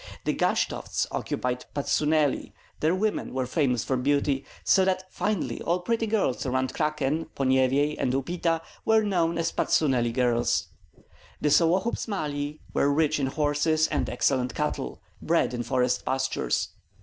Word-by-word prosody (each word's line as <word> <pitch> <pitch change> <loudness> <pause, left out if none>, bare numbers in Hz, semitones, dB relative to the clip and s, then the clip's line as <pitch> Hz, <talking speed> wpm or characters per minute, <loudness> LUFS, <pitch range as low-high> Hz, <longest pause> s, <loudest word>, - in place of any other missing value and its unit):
The - - 0
Gashtovts - - 0
occupied 125 0 -2
Patsuneli; 150 +1 +1 0.3
their 160 +4 +2
women 205 -8 -1
were 130 -1 0
famous 125 -3 +1
for 130 - 0
beauty, 140 +1 +1 0.2
so 190 - +4
that 185 0 +1
finally 210 -3 -2
all 175 +2 0
pretty 225 +4 0
girls 205 - 0
around 130 0 -1
Krakin, 150 0 -1
Ponyevyej, 135 +2 +2
and 125 - +1
Upita 165 +4 0 0.2
were 220 0 +4
known 170 -5 +1
as 165 0 0
Patsuneli 125 -6 +2
girls. 120 -1 +1 0.7
The 150 - +1
Sollohubs 180 +11 +2
Mali 150 -7 -3
were 140 - +2
rich 155 +1 +2
in 135 - 0
horses 150 +2 +1
and - - -1
excellent 125 -2 0
cattle, - - -3 0.2
bred - - +1
in 120 - -2
forest 125 +1 0
pastures. 130 0 -1
145 Hz, 140 wpm, -26 LUFS, 130-165 Hz, 0.7 s, so